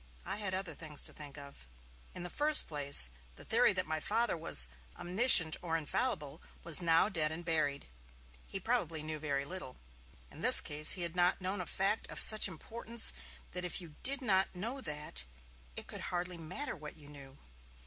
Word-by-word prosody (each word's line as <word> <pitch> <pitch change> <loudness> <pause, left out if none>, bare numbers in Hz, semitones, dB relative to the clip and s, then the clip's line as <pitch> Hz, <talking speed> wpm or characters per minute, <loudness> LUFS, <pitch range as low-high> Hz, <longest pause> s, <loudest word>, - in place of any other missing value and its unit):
I 200 - -5
had 200 -3 -2
other 185 -3 -2
things 150 -1 -3
to - - -2
think 145 -1 -9
of. 140 - -14 0.5
In 175 - -7
the 180 - -4
first 300 +1 +4
place, 140 - +2 0.2
the - - -11
theory 240 +2 +2
that 185 -1 -2
my 155 0 -4
Father 225 +7 -2
was 160 - +2 0.3
omniscient 175 -3 +7
or 165 -2 -3
infallible 160 - -4 0.2
was 170 +1 +4
now 165 +2 +2
dead 160 -7 0
and 170 +2 -9
buried. 155 -4 -2 0.6
He 195 - -5
probably 175 -8 -2
knew 155 0 -5
very 140 -2 -4
little; 150 -5 -6 0.5
in - - -13
this - - +8
case 150 +1 +3
he 180 - +1
had 170 0 -1
not 180 0 +1
known 185 +1 -4
a 175 - -8
fact 195 +3 -2
of - - -8
such 215 -1 +6
importance 225 +6 -3 0.4
that 180 0 -5
if 180 +1 -2
you 170 -4 -12
did 275 +1 +2
not 190 -5 0
know 230 +9 -5
that, 150 - -6 0.5
it - - -8
could - - -8
hardly 180 0 -4
matter 185 - -5
what 150 -1 -12
you 145 -2 -16
knew. 140 -2 -12
170 Hz, 190 wpm, -31 LUFS, 150-195 Hz, 0.6 s, this